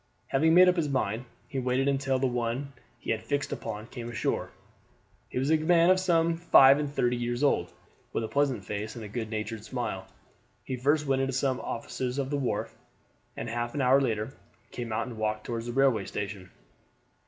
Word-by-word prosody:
Having 160 +4 +3
made 185 +1 +8
up 180 0 +4
his 155 -3 +1
mind, 125 -3 -1 0.2
he 135 - -3
waited 130 +2 +1
until 135 -1 +1
the 130 - 0
one 125 +3 -2 0.2
he - - -4
had 110 - -1
fixed 145 0 -2
upon 105 +1 -5
came 120 -1 -7
ashore. 115 - -1 0.8
He - - -5
was 135 +4 +1
a 160 - +5
man 170 +2 +4
of 185 - +4
some 170 -2 +2
five 140 -5 +7
and 145 -1 -2
thirty 125 -3 +1
years 120 +2 -2
old, 90 - +2 0.4
with - - -1
a - - -2
pleasant 135 -8 0
face 105 +2 -4
and 105 -3 -8
good 110 -2 -3
natured 110 0 -4
smile. 110 -7 -4 0.6
He 130 - -3
first 145 +4 +2
went 135 -1 +1
into 135 0 -1
some 130 0 0
offices 125 +2 -4
on 135 -1 -1
the 145 - 0
wharf, 135 -3 -2 0.6
and - - -4
half 120 +2 -3
an 145 - 0
hour 130 +2 +5
later 110 -1 -1 0.4
came 120 -2 -5
out 110 +1 -1
and 120 -3 -8
walked 110 0 -1
toward 115 -1 -3
the 120 - -3
railway 130 -6 +3
station. 100 -3 -5
125 Hz, 200 wpm, -28 LUFS, 115-140 Hz, 0.8 s, made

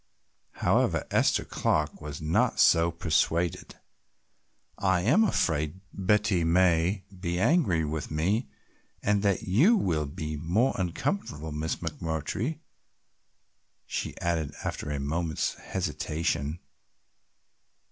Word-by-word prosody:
However, - - +2
Esther - - +2
Clark 75 0 -1
was 75 -1 -6
not 80 +1 +1
so 85 +1 +5
persuaded. 85 0 0 1.0
"I 95 -2 +2
am 140 - +4
afraid 80 - 0
Betty 100 -2 +2
may 90 +2 +3 0.2
be 85 -1 -2
angry 100 - +3
with 75 0 -4
me 95 - 0 0.5
and 105 -1 +2
that 100 -2 +1
you 150 - +4
will 80 - 0
be 75 +1 -5
more 90 - +1
uncomfortable, 85 - -2
Miss 75 +2 -2
McMurtry," 85 - -3 1.2
she - - -4
added 85 -4 -1
after - - -4
a 75 -1 -2
moment's 80 +2 -1
hesitation. 75 -1 -2
85 Hz, 105 wpm, -28 LUFS, 75-100 Hz, 1.2 s, so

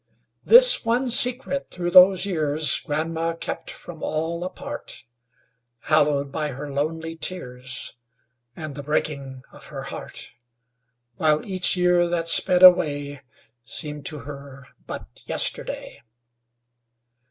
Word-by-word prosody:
This - - +6
one 245 +2 0
secret 260 +2 +1
through 175 -1 -4
those 185 +1 +7
years 155 -5 0
Grandma 165 +2 -3
kept - - -6
from 165 -3 -10
all 165 +2 -3
apart, 180 -6 -7 0.8
Hallowed 145 -2 +1
by 150 -1 -3
her 145 +2 -8
lonely 160 +3 -3
tears 125 -7 -3 0.6
And 155 -2 -7
the 145 - -7
breaking 140 -2 -3
of - - -10
her - - -7
heart; - - -8 0.9
While 155 -1 +1
each 185 -2 +3
year 180 -1 +2
that 170 -1 -1
sped 180 +2 +5
away 145 -6 +4 0.4
Seemed 150 +4 -3
to 150 -3 -4
her 140 0 -11 0.2
but 60 - -9
yesterday. - - -1
160 Hz, 115 wpm, -23 LUFS, 145-180 Hz, 0.9 s, those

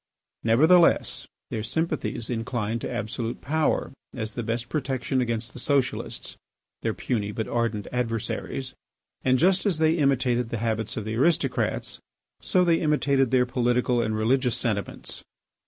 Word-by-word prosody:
Nevertheless, 160 +10 +4 0.2
their 110 - -2
sympathies 150 -2 -2
inclined 115 -1 -2
to - - -4
absolute 115 +2 -3
power 155 -1 0 0.2
as 110 -3 -3
the 120 - -3
best 115 +1 -2
protection 135 -2 -1
against 115 -1 -2
the - - -8
socialists, 140 -1 -1 0.5
their - - -1
puny 105 -4 -2
but 110 +1 -3
ardent 115 -4 -1
adversaries. 125 +2 -3 0.5
And 130 0 +4
just 185 +6 +3
as 195 -6 +1
they 160 +1 +3
imitated 125 -4 +2
the 115 - -2
habits 110 -1 -2
of 110 - -3
the 110 +1 -3
aristocrats, 160 +6 +1 0.4
so 180 -1 +2
they 165 -1 +3
imitated 140 -4 +2
their 125 0 +4
political 125 0 +1
and 110 -1 -1
religious 125 +2 +2
sentiments. 105 -4 -2
125 Hz, 140 wpm, -26 LUFS, 115-140 Hz, 0.5 s, Nevertheless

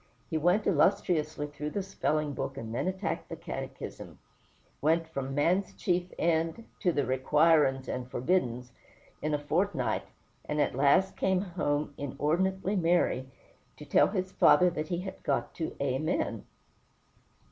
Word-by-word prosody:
He 160 - +1
went 180 +7 +2
illustriously 155 -3 +2
through 150 0 -5
the 200 +5 -3
spelling 155 -6 -1
book, 135 +1 -4
and 115 -4 -6
then 125 - -1
attacked 190 +1 -3
the - - -5
Catechism; - - -7 0.6
went 160 +2 +2
from 135 -4 -4
"man's 180 +7 +1
chief 180 0 -1
end" 165 +6 0
to 180 - +2
the 145 -4 0
"requirin's 135 +1 +3
and 125 0 -4
forbiddin's" 125 -5 0 0.5
in 155 0 0
a - - +1
fortnight, 145 - 0 0.4
and 150 - -2
at - - +2
last 145 +9 +3
came 190 -1 +1
home 150 -6 -1
inordinately 185 +8 0
merry, 170 -7 +1 0.5
to 150 - -10
tell 140 - +4
his 185 -2 -2
father 180 -1 +5
that 155 -2 -3
he 175 +1 -2
had 190 0 -7
got - - -1
to 160 - -4
"Amen." 140 +3 -1
155 Hz, 145 wpm, -30 LUFS, 140-180 Hz, 0.6 s, father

